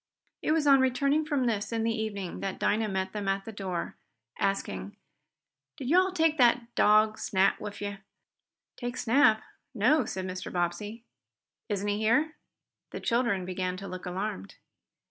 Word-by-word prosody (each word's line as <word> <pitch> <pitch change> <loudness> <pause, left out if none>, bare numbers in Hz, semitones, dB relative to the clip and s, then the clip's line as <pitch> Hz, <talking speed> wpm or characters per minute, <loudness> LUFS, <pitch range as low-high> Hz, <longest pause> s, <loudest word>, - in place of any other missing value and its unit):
It - - 0
was 315 -1 +2
on 275 -1 +7
returning 275 +4 +2
from 290 -4 0
this, 210 -3 -1
in 225 -1 -1
the 225 0 +1
evening, 205 -5 -4
that 195 -1 -3
Dinah 220 +1 +1
met 190 -1 -2
them 205 -2 -4
at 195 0 0
the 225 - -6
door, 190 -4 -4 0.4
asking: 195 0 -2 0.8
"Did 265 -4 -5
yo' 355 - +7
all 380 - -2
take 325 -4 +2
dat 240 -1 +3
dog 215 +1 +4
Snap 190 0 +2
wif 205 0 -7
yo?" 205 -1 -4 0.8
"Take 245 0 -4
Snap? 230 -3 +4 0.3
No," 250 +9 +3
said 190 0 -4
Mr. 185 0 -5
Bobbsey. 185 +6 -2 0.7
"Isn't 205 -1 -1
he 205 0 0
here?" 265 +9 +2 0.6
The - - -6
children 230 -6 +1
began 185 0 -3
to 195 +1 -7
look 185 0 -7
alarmed. 180 - -4
215 Hz, 165 wpm, -29 LUFS, 195-245 Hz, 0.8 s, on